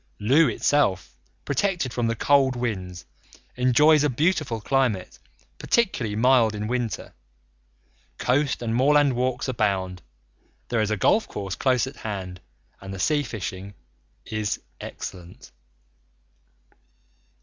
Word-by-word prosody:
Looe 135 +7 +4
itself, 95 - 0 0.3
protected 140 - -1
from 120 -2 0
the 115 - 0
cold 135 +1 +3
winds, 95 -7 -4 0.5
enjoys 145 +5 +4
a 150 - +2
beautiful 150 -3 0
climate, 115 -6 -1 0.4
particularly 130 - 0
mild 115 -1 +3
in 105 0 -4
winter. 120 -1 -3 1.0
Coast 135 0 0
and 115 -1 -2
moorland 145 +2 +4
walks 125 +2 -1
abound; 100 -7 -1 0.7
there 115 -2 +1
is 105 - 0
a 110 - 0
golf 220 - +2
course 100 -2 -5
close 130 0 +1
at 130 - -9
hand, 95 -4 -6 0.4
and 95 0 -8
the 95 - -6
sea 150 +9 +1
fishing 100 -5 -6 0.5
is 110 -1 -2 0.2
excellent. 90 -2 -9
120 Hz, 115 wpm, -24 LUFS, 100-135 Hz, 1.0 s, Looe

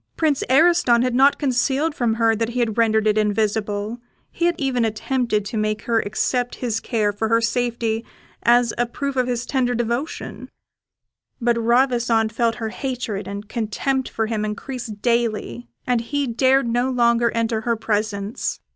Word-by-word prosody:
Prince 305 -4 +1
Ariston 270 -4 +4
had 250 -1 0
not 270 +3 +5
concealed 275 +3 +1
from 235 -5 0
her 225 -1 +3
that 225 +1 -1
he 245 +1 -3
had 225 -3 0
rendered 220 -2 +2
it 215 0 +3
invisible; 210 +1 -1 0.3
he 340 - -1
had 345 0 +2
even 265 -4 0
attempted 225 -1 -1
to 220 - -4
make 215 0 -1
her 230 -1 +1
accept 245 +4 -1
this 230 -3 -1
care 215 -4 0
for 220 +2 -2
her 230 +1 +3
safety 230 -1 -1 0.4
as 240 -1 +4
a 240 - +2
proof 280 +3 -4
of 255 -1 +1
his 245 -1 -2
tender 245 -2 0
devotion; 240 +6 -3 0.9
but 240 -1 +2
Ravissante 235 -1 +2
felt 230 -1 +1
her 225 -2 -4
hatred 235 -5 -4
and 200 +1 -6
contempt 245 +4 -2
for 225 - -1
him 215 -1 -2
increase 245 +4 -5
daily, 215 - -1 0.2
and 245 -2 +1
he 285 +4 -2
dared 260 +2 +2
no 240 +2 +1
longer 235 -2 +3
enter 225 -1 0
her 235 +1 0
presence. 210 -1 -2
235 Hz, 165 wpm, -22 LUFS, 220-250 Hz, 0.9 s, not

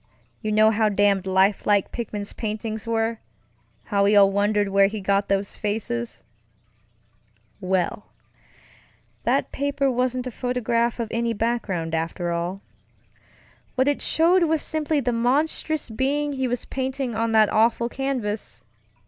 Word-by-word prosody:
You 215 - -2
know 215 +1 +5
how 215 0 +2
damned 200 -2 +2
lifelike 195 +1 +2
Pickman's 210 -3 -5
paintings 220 -1 -4
wereŌĆöhow 225 -2 -3
we 205 +1 +4
all 200 -1 +6
wondered 205 0 +1
where 195 0 +4
he 210 +2 -5
got 200 +1 +1
those 195 0 -1
faces. 205 - -3 1.4
WellŌĆöthat 185 +2 -4
paper 280 -1 0
wasn't 250 0 -1
a 255 - -4
photograph 235 -1 -1
of 230 -2 -2
any 230 0 0
background, 205 -8 -2
after 165 +2 -2
all. 175 +3 -3 1.1
What 260 +1 +2
it 290 - +1
showed 340 +2 +3
was 320 -2 +1
simply 310 -1 0
the 245 -1 0
monstrous 280 +4 0
being 285 +5 0
he 265 -1 -1
was 245 0 -3
painting 265 -1 -3
on 225 +1 -1
that 215 -1 +5
awful 230 +2 +2
canvas. 245 -5 -4
225 Hz, 130 wpm, -24 LUFS, 200-255 Hz, 1.4 s, all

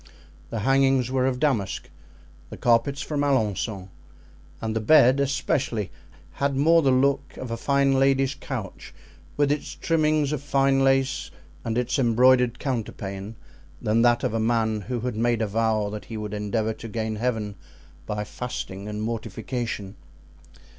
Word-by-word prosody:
The 115 - -3
hangings 135 0 +3
were 130 0 +2
of 125 -1 -1
damask, 115 -10 0 0.6
the - - -8
carpets 125 +4 +2
from 145 -2 -2
Alencon, 110 -7 0 0.7
and 110 0 -3
the - - +1
bed, 130 +3 +5
especially, 135 -5 -1 0.4
had 140 0 -1
more 165 +5 +5
the 140 - +2
look 135 +1 +1
of 125 -3 -6
a - - -1
fine 140 +3 +2
lady's 135 0 +3
couch, 130 -8 -7 0.4
with 145 -1 +3
its 145 - -3
trimmings 155 -3 +1
of 150 - -2
fine 135 -1 +2
lace 135 0 +1 0.3
and 115 0 -2
its 125 +2 0
embroidered 125 0 +4
counterpane, 105 -5 -4 0.4
than 110 +2 +1
that 120 0 +3
of - - 0
a 115 - 0
man 110 -1 +1
who 120 +3 -4
had 125 -1 -3
made 115 0 +1
a - - +2
vow 110 -1 0
that 105 0 -7
he 115 - -7
would 105 -1 -5
endeavor 105 +2 -1
to 115 - -9
gain 110 0 -3
Heaven 110 -3 -1 0.5
by 105 0 -2
fasting 105 -3 -6
and 105 0 -4
mortification. 115 -2 -4
120 Hz, 155 wpm, -25 LUFS, 110-135 Hz, 0.7 s, bed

